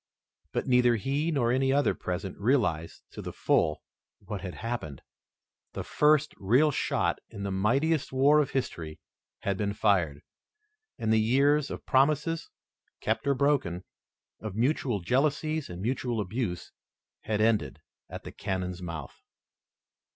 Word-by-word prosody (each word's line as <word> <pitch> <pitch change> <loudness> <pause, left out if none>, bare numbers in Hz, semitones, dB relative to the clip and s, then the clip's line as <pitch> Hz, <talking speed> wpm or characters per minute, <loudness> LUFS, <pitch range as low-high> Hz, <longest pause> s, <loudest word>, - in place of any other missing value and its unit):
But - - -1
neither 125 -2 +4
he 140 +8 -1
nor 130 -7 +1
any 135 +1 +2
other 140 +1 +3
present 90 +1 -4
realized 100 - 0
to - - -8
the - - -5
full 75 - +1 0.3
what 100 -1 -6
had 90 -2 -6
happened. 105 - -5 0.7
The - - -4
first 150 0 +3
real 125 +11 +3
shot - - 0
in 100 - -7
the 100 - -2
mightiest 135 +11 +1
war 140 +3 +5
of 140 - -1
history 80 - -3 0.4
had 100 -1 -1
been 100 0 -1
fired, 85 -10 +1 0.7
and 110 -1 +1
the 110 - +4
years 140 +5 +3
of - - -7
promises, 150 +4 +2 0.5
kept 110 +4 -1
or 140 - +3
broken, 125 -11 +1 0.6
of 110 -3 -6
mutual 120 -3 +1
jealousies 150 - 0
and 90 +1 -7
mutual 120 -1 -1
abuse 105 -2 -3 0.5
had 105 -1 0
ended 110 -10 +1 0.3
at - - -7
the - - -8
cannon's 90 -1 -3
mouth. 80 -7 -7
115 Hz, 140 wpm, -28 LUFS, 95-140 Hz, 0.7 s, war